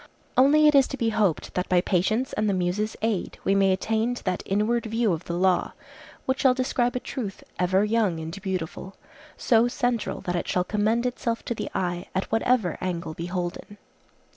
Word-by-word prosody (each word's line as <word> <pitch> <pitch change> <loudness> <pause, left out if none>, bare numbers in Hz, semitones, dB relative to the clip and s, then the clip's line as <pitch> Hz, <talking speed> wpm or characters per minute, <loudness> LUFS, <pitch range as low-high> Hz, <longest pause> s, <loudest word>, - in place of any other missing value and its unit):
Only 285 +4 +5
it 300 - +5
is 275 -2 +5
to 275 - -5
be 230 -3 +1
hoped 205 -6 0
that 180 - -2
by 180 - +4
patience 215 +9 0
and 215 0 0
the 195 - +1
Muses' 185 +4 -1
aid 220 -5 -1
we 195 - +2
may 195 -1 +4
attain 220 +5 0
to - - -9
that 185 -1 -1
inward 220 +4 +1
view 225 -3 +1
of 165 +1 -5
the 170 - -3
law 185 0 +2 0.5
which 260 0 0
shall 260 -2 +4
describe 250 -1 0
a - - 0
truth 220 -6 -6 0.2
ever 185 +2 +3
young 210 -6 +1
and 165 +5 -6
beautiful, 190 0 -4 0.4
so 230 0 +3
central 245 -1 -1
that 180 - -2
it 175 - -2
shall 180 - +1
commend 215 +5 0
itself 235 -2 -2
to - - -1
the - - -5
eye, 175 -1 -2
at 190 - -2
whatever 225 -5 +1
angle 175 -3 -3
beholden. 175 +4 -5
205 Hz, 190 wpm, -25 LUFS, 180-235 Hz, 0.5 s, Only